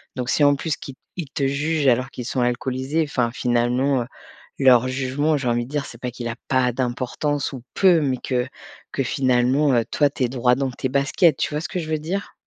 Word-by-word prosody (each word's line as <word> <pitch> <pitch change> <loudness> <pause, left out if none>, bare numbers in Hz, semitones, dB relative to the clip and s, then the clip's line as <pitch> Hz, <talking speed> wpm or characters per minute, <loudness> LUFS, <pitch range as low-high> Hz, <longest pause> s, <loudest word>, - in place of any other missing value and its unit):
donc, 125 -1 -3
si 150 - +2
en 145 0 +5
plus 150 +1 -2
qui 135 - -9 0.2
ils 165 -6 -5
te 140 -1 -1
jugent 145 +2 0
alors 125 +1 +3
qu'ils 125 - -7
sont 125 +1 -1
alcoolisés, 130 +5 0
enfin, 125 -4 0
finalement, 125 +2 +1
heu, - - -11 0.5
leur 130 -2 +5
jugement, 135 +4 0
j'ai 135 -3 -3
envie 120 0 +1
de - - -14
dire, 145 -2 -1
c'est 115 - -11
pas 125 0 -4
qu'il 120 0 -6
a 115 - -4
pas 130 -2 +2
d'importance 130 +4 -2
ou 130 - -7
peu, 185 -4 +5
mais 135 -3 0
que 125 -1 -1 0.4
que 135 - -1
finalement, 130 +2 +2
heu, 120 - +3
toi 145 -1 +3
tu 135 - -3
es - - -2
droit 125 0 +2
dans 135 0 -1
tes 125 - -3
baskets, 140 +3 +3
tu - - -1
vois 150 - -1
ce - - -4
que 180 - -3
je 160 -2 -5
veux 155 - 0
dire? 185 +6 -4
130 Hz, 230 wpm, -22 LUFS, 125-145 Hz, 0.5 s, en